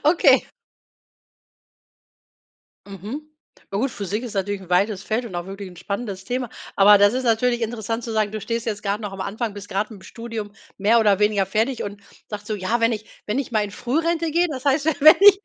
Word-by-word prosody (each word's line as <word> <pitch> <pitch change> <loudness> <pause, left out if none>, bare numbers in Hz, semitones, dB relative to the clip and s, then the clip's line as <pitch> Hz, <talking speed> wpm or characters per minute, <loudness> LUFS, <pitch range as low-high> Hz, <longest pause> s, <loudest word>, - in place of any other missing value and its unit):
Okay. 330 +4 +5 2.4
Mhm. 210 - -7 0.4
Ja 195 - -1
gut, 255 +5 0
Physik 205 +3 -4
ist 235 -3 -6
natürlich 200 0 -2
'n 185 - -14
weites 195 +2 +1
Feld 230 +3 -1
und 200 -6 -7
auch 175 0 -3
wirklich 195 0 -7
'n 180 - -14
spannendes 200 +1 -5
Thema. 245 +3 -3 0.3
Aber 205 +1 +7
das 205 +2 +5
ist 260 +1 -1
natürlich 240 +1 +2
interessant 225 0 -3
zu 230 - -5
sagen, 215 -2 +1
du 215 - -4
stehst 230 +1 -3
jetzt 210 -2 -3
grad 205 +1 -2
noch 205 -2 -5
am 195 - -6
Anfang, 215 +3 -3
bist 205 0 -9
grad 200 +3 -1
mit'm 200 -3 -12
Studium 230 -3 -6 0.3
mehr 215 +4 +4
oder 205 -3 +3
weniger 210 -2 +2
fertig 220 +6 0
und 200 0 -7 0.3
sagst 210 -1 -7
so: 215 - -1
„Ja, 210 +5 -1
wenn 230 +1 +3
ich 215 -1 -6 0.2
wenn 215 +6 0
ich 275 - -4
mal 215 -2 +2
in 205 - -6
Frührente 320 +8 -1
gehe, 345 +3 +3
das 265 -3 -6
heißt, 280 +1 +2 0.2
wenn 310 +2 +10
ich“ 400 0 +8
215 Hz, 210 wpm, -22 LUFS, 200-245 Hz, 2.4 s, wenn